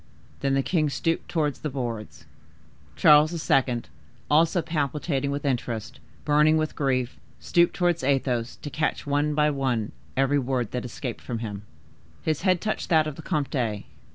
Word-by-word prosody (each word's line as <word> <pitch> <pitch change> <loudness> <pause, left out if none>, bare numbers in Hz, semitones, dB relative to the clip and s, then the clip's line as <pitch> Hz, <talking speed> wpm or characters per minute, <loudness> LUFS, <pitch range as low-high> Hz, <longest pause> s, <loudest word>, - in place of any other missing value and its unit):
Then 135 -1 +1
the 135 - +2
king 155 -3 +1
stooped 165 +3 -1
towards 150 -4 0
the 155 - -3
boards." 120 -5 -5 0.7
Charles 155 +2 +4
II., 125 -3 +3 0.5
also 165 +3 +4
palpitating 145 -2 -1
with 140 +1 -3
interest, 125 -2 -2 0.3
burning 150 +1 +4
with 155 0 -1
grief, 130 -3 -1 0.2
stooped 170 0 +2
towards 175 -4 +1
Athos, 130 -3 0
to 145 - -5
catch, 155 +1 -1
one 145 +1 +1
by 150 0 +3
one, 130 -6 -1 0.3
every 135 +2 +3
word 125 -4 -1
that 125 -1 -3
escaped 125 0 -5
from 120 - -4
him. 105 -2 -6 0.6
His 155 -2 0
head 185 -2 +2
touched 215 - -2
that 160 -3 +4
of 155 -2 -4
the 160 - -9
comte. 125 -9 -1
140 Hz, 155 wpm, -26 LUFS, 125-155 Hz, 0.7 s, Charles